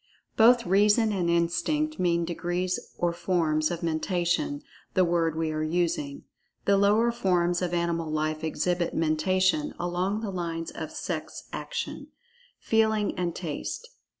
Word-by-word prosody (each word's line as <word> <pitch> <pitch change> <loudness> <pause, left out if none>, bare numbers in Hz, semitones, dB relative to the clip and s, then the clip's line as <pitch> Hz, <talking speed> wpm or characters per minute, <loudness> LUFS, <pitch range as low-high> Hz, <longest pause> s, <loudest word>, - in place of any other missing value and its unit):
Both 235 +1 +6
"Reason" 210 +4 +4
and 180 -4 0
"Instinct" 300 - 0
mean 170 -1 +2
degrees 175 +2 -2 0.2
or 175 -1 +1
forms 165 -3 +1
of 170 0 -4
"Mentation," 170 -2 0 0.3
the 185 - +5
word 165 -2 +1
we 160 -1 -1
are 155 0 -2
using. 155 -3 -1 0.4
The 200 - +4
lower 210 +4 +4
forms 180 -6 +1
of 180 -1 -1
animal 170 -2 -1
life 155 0 -1
exhibit 175 +2 -1
Mentation 185 - +1
along 180 +4 -1
the 215 -3 -3
lines 165 -2 -3
of - - -6
sex - - -5
action; - - -4 0.5
feeling 220 -2 +1
and 175 -2 -2
taste. 185 - -5
175 Hz, 135 wpm, -27 LUFS, 165-200 Hz, 0.5 s, Both